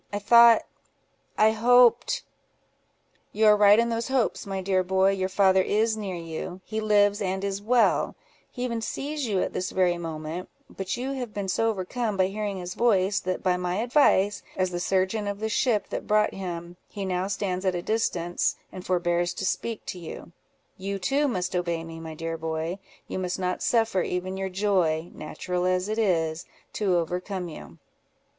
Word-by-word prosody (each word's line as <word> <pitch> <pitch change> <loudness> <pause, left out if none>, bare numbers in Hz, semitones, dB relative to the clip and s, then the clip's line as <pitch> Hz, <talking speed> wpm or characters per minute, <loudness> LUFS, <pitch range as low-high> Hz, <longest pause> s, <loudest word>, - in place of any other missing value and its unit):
I 205 - -2 1.2
thought—I 215 +1 +5
hoped——" 240 +2 +4 1.1
"You 220 +1 +1
are 210 0 +7
right 205 0 +6
in 235 +1 +2
those 230 0 -2
hopes, 260 -5 0
my 195 -1 -3
dear 190 0 +1
boy; 190 +1 +2
your 190 -1 -1
father 190 0 +4
is 220 +3 +1
near 200 -4 -4
you; 170 +2 -6
he 220 0 -3
lives 205 -1 +3
and 190 0 -2
is 200 0 -2
well; 235 +3 +2 0.3
he 250 - -6
even 235 -2 -2
sees 285 +4 -3
you 195 -4 +1
at - - -4
this 185 - -2
very 180 -2 +1
moment; 160 +1 -5 0.2
but 195 +3 -4
you 260 +2 -3
have 250 -5 -5
been 200 -1 -3
so 225 +4 +1
overcome 215 +2 -2
by 190 - +4
hearing 205 -1 -3
his 180 0 -5
voice, 200 -4 +2
that 185 0 -3
by 180 -1 +2
my 180 0 -2
advice, 215 -4 +3 0.2
as 185 -1 0
the 175 - -3
surgeon 190 +3 0
of 200 0 -3
the 220 +1 -2
ship 220 -1 +1
that - - -5
brought 210 0 +3
him, 175 -2 -6
he 200 -2 -5
now 185 0 -1
stands 190 -2 -2
at 185 -2 +1
a 175 - -3
distance, 175 -6 0 0.2
and 185 - -8
forbears 175 -1 0
to 190 - -3
speak 230 +3 -2
to 180 - -6
you. 170 0 -9 0.5
You 195 +1 -3
too 275 +10 +1
must 185 -7 -2
obey 170 -2 -1
me, 165 0 -9
my 160 -1 -7
dear 165 0 -4
boy; 160 +3 -3 0.3
you - - -4
must 180 -1 -2
not 180 -1 -2
suffer 225 -5 +2
even 180 +2 -3
your 190 0 -3
joy 180 -4 0
(natural 180 +4 -4
as 185 +1 +1
it 215 +1 -2
is) 165 -5 0 0.3
to 195 -4 +1
overcome 180 +2 -3
you." 75 - -11
190 Hz, 185 wpm, -26 LUFS, 180-215 Hz, 1.2 s, are